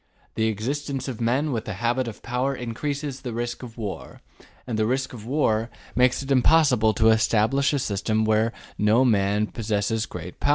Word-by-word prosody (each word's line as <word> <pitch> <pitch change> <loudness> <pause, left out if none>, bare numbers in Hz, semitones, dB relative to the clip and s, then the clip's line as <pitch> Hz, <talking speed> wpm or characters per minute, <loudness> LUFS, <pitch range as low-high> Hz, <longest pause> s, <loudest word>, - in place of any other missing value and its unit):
The 110 0 +1
existence 135 +5 -3
of 120 -3 -5
men 130 +6 +1
with 115 -3 -2
the 110 - -4
habit 120 +4 0
of 115 - -8
power 130 +3 -1
increases 135 +3 -4
the 125 -3 -5
risk 120 +1 -3
of 120 -2 -10
war, 105 -4 -6 0.4
and 110 -3 -3
the 110 - +2
risk 130 +2 -1
of 110 -2 -9
war 115 -5 +1 0.3
makes 125 +2 +3
it 135 - -5
impossible 130 -4 +4
to 110 0 +4
establish 110 +5 +2
a 145 - +1
system 110 -2 0
where 110 +1 +2 0.3
no 110 +5 +4
man 105 -2 +2
possesses 110 0 -1
great 90 0 -8
power. - - 0
115 Hz, 180 wpm, -24 LUFS, 110-130 Hz, 0.4 s, impossible